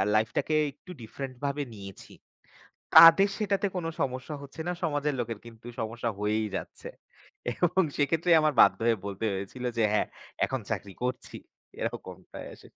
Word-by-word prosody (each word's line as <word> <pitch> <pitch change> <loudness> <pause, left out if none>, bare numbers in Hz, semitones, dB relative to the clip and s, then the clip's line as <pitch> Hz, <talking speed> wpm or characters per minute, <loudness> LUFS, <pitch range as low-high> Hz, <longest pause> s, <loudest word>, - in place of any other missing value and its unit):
Life 110 +1 +3
টাকে 155 - 0 0.2
একটু 180 +6 -14
different 130 +4 -7
ভাবে 140 +1 -1
নিয়েছি। 100 -2 -11 0.8
তাদের 165 +5 +10
সেটাতে 205 -2 0
কোনো 170 -2 -2
সমস্যা 130 +3 -2
হচ্ছে 140 +3 -11
না, - - +1
সমাজের 145 -3 0
লোকের 115 -2 -4
কিন্তু 115 0 -13
সমস্যা 115 +1 -2
হয়েই 105 +1 0
যাচ্ছে। - - -7 0.6
এবং 175 +7 +2
সেক্ষেত্রেই 165 +4 +3
আমার 155 -1 +2
বাধ্য - - +6
হয়ে 115 - +4
বলতে 100 +2 -5
হয়েছিল 100 +6 -6
যে - - +3
"হ্যাঁ, 105 - +2 0.4
এখন 130 -1 -2
চাকরি 100 -2 -4
করছি।" 125 0 -3 0.4
এরকমটাই - - -6
আস - - -18
130 Hz, 150 wpm, -28 LUFS, 110-160 Hz, 0.8 s, তাদের